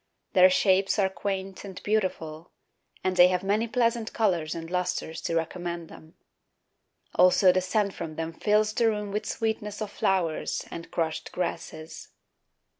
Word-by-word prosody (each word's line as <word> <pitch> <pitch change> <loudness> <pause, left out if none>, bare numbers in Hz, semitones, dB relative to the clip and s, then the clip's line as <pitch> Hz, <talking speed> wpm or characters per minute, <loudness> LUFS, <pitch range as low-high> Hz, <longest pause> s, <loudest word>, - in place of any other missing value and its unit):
Their 185 -2 +7
shapes 190 +1 +3
are 195 -2 +3
quaint 195 -1 -4
and 190 -2 -8
beautiful, 175 -6 -2 0.5
And 185 0 0
they 180 0 +8
have 180 0 0
many 210 +4 +1
pleasant 230 -1 0
colours 175 -8 +1
and 165 -1 -6
lustres 180 -2 -2
To 165 - -2
recommend 170 0 -3
them. 160 +1 -14 1.0
Also 185 +1 +6
the 185 +1 +1
scent 200 +1 0
from 165 -3 -6
them 165 +1 -4
fills 210 +4 +2
the 230 0 +2
room 210 -2 -3
With 210 +1 -3
sweetness 215 -2 -2
of 215 -2 -4
flowers 180 -7 0
and 165 - -7
crushed 160 -2 -2
grasses. 160 -2 -5
185 Hz, 150 wpm, -27 LUFS, 170-210 Hz, 1.0 s, they